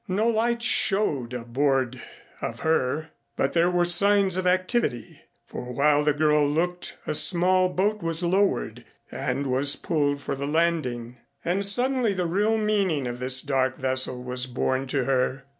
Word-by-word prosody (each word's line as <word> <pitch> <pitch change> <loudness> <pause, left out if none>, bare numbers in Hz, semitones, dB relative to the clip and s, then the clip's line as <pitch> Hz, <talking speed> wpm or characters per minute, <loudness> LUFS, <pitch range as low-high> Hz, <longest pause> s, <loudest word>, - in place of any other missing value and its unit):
No 210 +5 +1
lights 235 +1 0
showed 175 - +1
aboard 130 +1 -1 0.4
of - - -5
her, 155 0 0 0.3
but 135 - 0
there 170 +1 +3
were 175 -1 +1
signs 200 +1 +3
of 185 0 -1
activity, 185 - -1 0.2
for 125 0 -7
while 150 +1 +3
the 150 - +3
girl 150 0 +2
looked 175 +4 -2
a - - -2
small 185 +3 +3
boat 205 +3 -1
was 165 +1 -1
lowered 190 +3 0 0.3
and 140 - -3
was 135 +2 +2
pulled 145 -3 -1
for - - -4
the 140 +1 -4
landing; 145 -7 -1 0.3
and 185 +4 0
suddenly 245 +2 +1
the 180 -1 -1
real 205 +6 +1
meaning 200 -9 0
of 120 0 -5
this 130 0 0
dark 130 -2 0
vessel 130 -1 0
was 125 0 -3
borne 130 +1 -2
to 135 0 -1
her. 130 0 0
155 Hz, 160 wpm, -25 LUFS, 130-185 Hz, 0.4 s, there